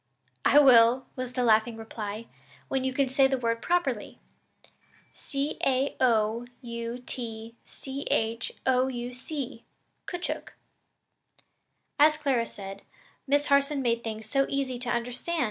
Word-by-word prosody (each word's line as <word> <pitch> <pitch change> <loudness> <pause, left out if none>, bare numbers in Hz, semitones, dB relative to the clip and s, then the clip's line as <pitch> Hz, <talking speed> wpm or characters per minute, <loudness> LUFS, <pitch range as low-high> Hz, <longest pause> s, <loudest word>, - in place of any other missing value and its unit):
"I 285 - +5
will," 250 -2 +7
was 255 -1 -5
the 250 - 0
laughing 225 0 +3
reply, 220 -1 -6 0.4
"when 265 -1 0
you 260 - 0
can 270 +1 +1
say 265 +1 +4
the 265 0 0
word 230 -2 -1
properly. 315 -11 -1 1.0
C 280 +1 -3
a 270 +1 +1
o 230 -1 +2
u 235 0 -6
t 225 -2 -6
c 270 +1 -7
h 225 +1 0
o 260 0 +3
u 245 -1 -4
c 260 -2 -6 0.4
koochook." 355 -1 -4 1.5
As 305 +1 +6
Clara 265 -6 +1
said, 195 0 -9 0.5
Miss 285 +1 +3
Harson 280 0 +2
made 235 -1 +1
things 220 -1 -5
so 275 +4 +2
easy 265 -3 -2
to 245 -1 -3
understand! 245 +8 -2
250 Hz, 135 wpm, -28 LUFS, 230-275 Hz, 1.5 s, will